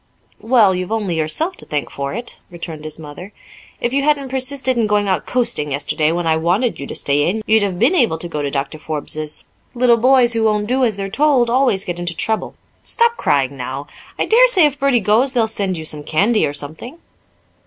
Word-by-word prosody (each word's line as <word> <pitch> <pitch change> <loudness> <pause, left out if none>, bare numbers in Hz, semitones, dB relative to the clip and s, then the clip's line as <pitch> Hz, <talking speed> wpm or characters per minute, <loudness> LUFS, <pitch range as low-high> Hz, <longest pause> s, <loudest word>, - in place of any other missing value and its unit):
"Well, 225 -5 +3
you've 185 +2 -4
only 210 -5 -1
yourself 235 - -1
to - - -9
thank 150 -1 -3
for 140 0 -4
it," 240 +1 -6
returned 165 -3 -8
his 155 - -6
mother. 160 +6 -10 0.5
"If 240 - -2
you 280 - +2
hadn't 285 -2 0
persisted 260 0 0
in 230 -2 +1
going 205 -1 +1
out 190 - -1
coasting 235 - 0
yesterday 150 +2 0
when 175 0 -2
I 160 -1 +2
wanted 185 +9 0
you 140 - -6
to - - -7
stay 145 +3 +1
in, 215 +4 -3
you'd 220 0 +3
have 195 -3 -2
been 245 - +3
able 235 - +2
to 175 - -4
go 150 -3 -4
to 145 - -2
Doctor 140 +2 -4
Forbes's. 155 0 -4 0.3
Little 240 -1 +4
boys 250 0 +4
who 225 -1 0
won't 210 -1 +1
do 255 +4 0
as 220 -5 +1
they're 195 -1 -3
told 255 +1 +2
always 245 -6 +1
get 175 -1 -4
into 175 -1 -3
trouble. 220 0 -2 0.3
Stop 470 0 +1
crying, 140 - 0
now. 135 +2 -6 0.3
I - - 0
dare - - +6
say 380 -10 +5
if 290 -1 -1
Bertie 275 -4 +2
goes 225 +7 +2
they'll 235 -3 +2
send 200 -4 -2
you 160 - -7
some 150 -1 0
candy, 200 +10 +1
or 145 - -5
something." 155 - -5
205 Hz, 215 wpm, -18 LUFS, 155-250 Hz, 0.5 s, dare